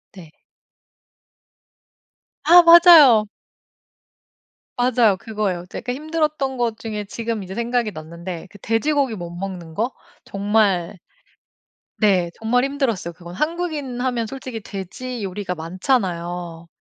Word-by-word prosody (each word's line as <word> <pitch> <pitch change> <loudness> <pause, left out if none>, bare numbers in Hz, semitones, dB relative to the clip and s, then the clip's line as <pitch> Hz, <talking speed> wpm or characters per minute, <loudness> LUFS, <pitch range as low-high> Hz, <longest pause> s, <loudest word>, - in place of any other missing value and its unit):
네. 165 -5 -13 2.1
아 350 +1 +8
맞아요. 330 -10 +8 1.5
맞아요. 240 -5 +3
그거예요. 200 -5 -3
제가 245 +4 -5
힘들었던 305 -2 -2
것 235 -2 -1
중에 215 -2 -5
지금 225 0 -4
이제 190 - -8
생각이 235 -2 -1
났는데 170 +2 -8
그 - - -15
돼지고기 265 +4 0
못 175 -3 -7
먹는 175 -2 -7
거? 235 +7 -1 0.3
정말 200 -2 0 1.0
네 185 -5 +2
정말 245 +3 +1
힘들었어요. 260 - -2
그건 175 +1 -11
한국인 305 - -3
하면 250 -3 -1
솔직히 255 -2 -7
돼지 210 +5 -7
요리가 190 -1 -4
많잖아요. 175 -2 -2
220 Hz, 245 characters per minute, -21 LUFS, 180-255 Hz, 2.1 s, 아